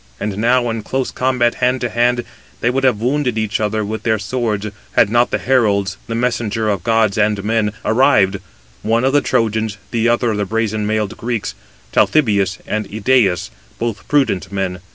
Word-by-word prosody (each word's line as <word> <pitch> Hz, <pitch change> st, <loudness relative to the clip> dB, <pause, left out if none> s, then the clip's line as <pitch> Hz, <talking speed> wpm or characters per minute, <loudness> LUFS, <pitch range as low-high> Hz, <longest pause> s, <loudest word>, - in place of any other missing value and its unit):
And 105 Hz, -1 st, -3 dB
now 120 Hz, +2 st, +2 dB
in 115 Hz, 0 st, -3 dB
close 130 Hz, +4 st, -2 dB
combat 125 Hz, -2 st, +1 dB
hand 125 Hz, +1 st, +2 dB
to 120 Hz, -, -1 dB
hand, 120 Hz, +2 st, +1 dB, 0.4 s
they 120 Hz, -, +1 dB
would 135 Hz, +1 st, -1 dB
have 125 Hz, -6 st, +3 dB
wounded 125 Hz, 0 st, 0 dB
each 110 Hz, -1 st, -1 dB
other 110 Hz, 0 st, -1 dB
with 110 Hz, +2 st, -4 dB
their 110 Hz, -2 st, +1 dB
swords, 110 Hz, 0 st, -2 dB, 0.3 s
had 100 Hz, -, +3 dB
not 120 Hz, +1 st, +3 dB
the -, -, 0 dB
heralds, 100 Hz, -7 st, +1 dB
the 115 Hz, -, -3 dB
messengers 115 Hz, -3 st, 0 dB
of 95 Hz, -4 st, -5 dB
gods 110 Hz, -3 st, +2 dB
and 105 Hz, -1 st, +1 dB
men, 110 Hz, -1 st, +1 dB
arrived, 110 Hz, -5 st, +3 dB, 0.4 s
one 115 Hz, +2 st, +1 dB
of 135 Hz, +1 st, +2 dB
the 145 Hz, -, +4 dB
Trojans, 110 Hz, -2 st, 0 dB
the 115 Hz, 0 st, +1 dB
other 120 Hz, 0 st, +2 dB
of 105 Hz, -, -2 dB
the 105 Hz, -, -1 dB
brazen 110 Hz, 0 st, -1 dB
mailed 110 Hz, -1 st, -1 dB
Greeks, 115 Hz, -2 st, -3 dB, 0.4 s
Talthybius 100 Hz, -, +2 dB
and 105 Hz, -1 st, -3 dB
Idæus, 110 Hz, -4 st, +1 dB, 0.3 s
both 115 Hz, -3 st, -4 dB
prudent 135 Hz, -12 st, +1 dB
men. 95 Hz, -2 st, -2 dB
110 Hz, 180 wpm, -18 LUFS, 105-120 Hz, 0.4 s, the